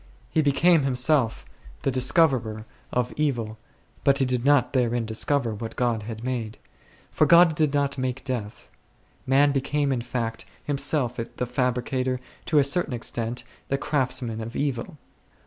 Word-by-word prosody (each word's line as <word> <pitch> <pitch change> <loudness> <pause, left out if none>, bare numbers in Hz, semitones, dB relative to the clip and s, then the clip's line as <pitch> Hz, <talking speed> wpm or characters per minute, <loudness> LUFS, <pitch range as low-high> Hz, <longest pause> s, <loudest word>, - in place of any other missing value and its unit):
He 160 - +3
became 155 +3 +4
him 135 -2 0
self 125 -3 +2 0.4
the 135 - +1
discoverer 130 -5 +2 0.3
of 125 -1 -1
evil, 120 -8 -1 0.4
but 140 -1 +4
he 135 - +2
did 125 -2 -1
not 140 -3 +3
there 120 -3 +1
in 120 -2 -1
discover 115 +2 0
what 115 +2 -6
God 120 -3 0
had 110 +1 -7
made; 120 -4 -3 0.5
for - - +3
God 170 -1 +7
did 150 -1 +1
not 140 -1 0
make 130 0 -3
death. 120 -6 -5 0.6
Man 140 +2 +4
became, 140 +1 0
in 125 -3 0
fact, 115 -2 -3 0.2
himself 140 -3 0 0.2
the 125 - -2
fabricator, 125 +1 -1 0.3
to 155 - +2
a 145 - +6
certain 150 0 0
extent, 115 +1 -2
and - - -23 0.2
the 135 - +1
craftsman 130 -5 -1
of 115 +2 -7
evil. 140 +1 -2
130 Hz, 160 wpm, -25 LUFS, 120-140 Hz, 0.6 s, God